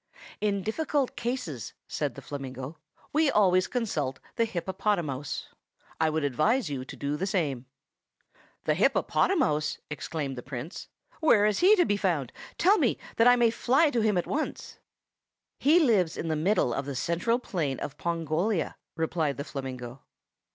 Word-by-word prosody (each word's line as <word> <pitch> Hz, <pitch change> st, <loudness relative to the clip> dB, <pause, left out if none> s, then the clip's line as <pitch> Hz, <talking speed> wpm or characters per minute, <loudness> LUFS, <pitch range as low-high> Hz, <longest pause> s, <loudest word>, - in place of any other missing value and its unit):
"In 200 Hz, -2 st, 0 dB
difficult 280 Hz, -, -1 dB
cases," 235 Hz, -, -4 dB
said -, -, -2 dB
the -, -, -10 dB
flamingo, 135 Hz, +1 st, -6 dB, 0.3 s
"we 310 Hz, 0 st, +4 dB
always 185 Hz, -6 st, +4 dB
consult 155 Hz, -, -2 dB, 0.2 s
the 230 Hz, -, +2 dB
hippopotamouse. 175 Hz, -7 st, -2 dB, 0.5 s
I 160 Hz, 0 st, +3 dB
should 155 Hz, 0 st, -1 dB
advise 155 Hz, -, +1 dB
you 130 Hz, -2 st, -3 dB
to 130 Hz, -, -9 dB
do 140 Hz, +1 st, -2 dB
the 190 Hz, +6 st, -2 dB
same." 145 Hz, -, -1 dB, 1.0 s
"The -, -, +2 dB
hippopotamouse?" 155 Hz, -, +2 dB
exclaimed 145 Hz, -3 st, -4 dB
the -, -, -6 dB
Prince. 135 Hz, -, -7 dB, 0.3 s
"Where 225 Hz, -10 st, +5 dB
is 210 Hz, -1 st, +2 dB
he 390 Hz, +4 st, +7 dB
to 355 Hz, -4 st, +4 dB
be 205 Hz, -, +1 dB
found? 165 Hz, -, 0 dB, 0.3 s
Tell 395 Hz, +5 st, +5 dB
me, -, -, +2 dB, 0.2 s
that 230 Hz, -, +6 dB
I 245 Hz, -, +8 dB
may 235 Hz, -2 st, +4 dB
fly 270 Hz, +7 st, +3 dB
to 240 Hz, -4 st, +1 dB
him 215 Hz, -3 st, +2 dB
at 175 Hz, -, 0 dB
once." 310 Hz, +2 st, -4 dB, 0.8 s
"He 310 Hz, +5 st, +5 dB
lives 210 Hz, -, +3 dB
in 165 Hz, -, -3 dB
the 160 Hz, -, +1 dB
middle 155 Hz, -, +2 dB
of 140 Hz, -, -2 dB
the 140 Hz, -, -4 dB
central 170 Hz, -, +1 dB
plain 160 Hz, -, -2 dB
of 145 Hz, 0 st, -6 dB
Pongolia," 170 Hz, +3 st, -1 dB, 0.2 s
replied 160 Hz, -3 st, -1 dB
the 140 Hz, -, -3 dB
flamingo. 130 Hz, -3 st, -6 dB
170 Hz, 160 wpm, -28 LUFS, 145-230 Hz, 1.0 s, I